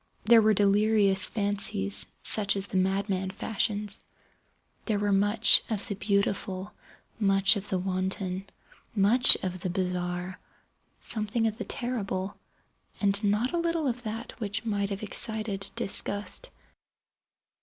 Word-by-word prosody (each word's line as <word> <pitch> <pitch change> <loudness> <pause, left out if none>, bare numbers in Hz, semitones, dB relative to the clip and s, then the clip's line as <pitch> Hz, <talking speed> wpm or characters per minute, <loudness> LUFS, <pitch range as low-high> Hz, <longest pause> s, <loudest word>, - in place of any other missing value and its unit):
There 230 +1 +6
were 215 0 +3
delirious 205 -1 +3
fancies 195 - +2 0.2
such 205 -2 +3
as 195 -1 0
the 195 - -4
madman 190 0 -1
fashions. 205 +1 -2 0.8
There 215 -3 -1
were 205 0 -1
much 205 +3 +5
of 215 0 -3
the 210 - -3
beautiful, 200 -1 -2 0.5
much 195 0 +3
of 200 0 -6
the 190 - -1
wanton, 185 +1 -3 0.5
much 220 +5 +7
of 185 -1 -4
the 180 - -4
bizarre, 180 0 -4 0.6
something 220 +1 0
of 220 +1 -2
the 220 - -4
terrible, 200 -6 -4 0.6
and 200 +1 +1
not 210 +7 0
a 345 - 0
little 335 -2 -1
of 245 -1 -3
that 225 0 -6
which 205 -1 -3
might 200 -2 -2
have 200 +1 -6
excited 215 -2 -3
disgust. 205 - -2
200 Hz, 130 wpm, -27 LUFS, 190-220 Hz, 0.8 s, much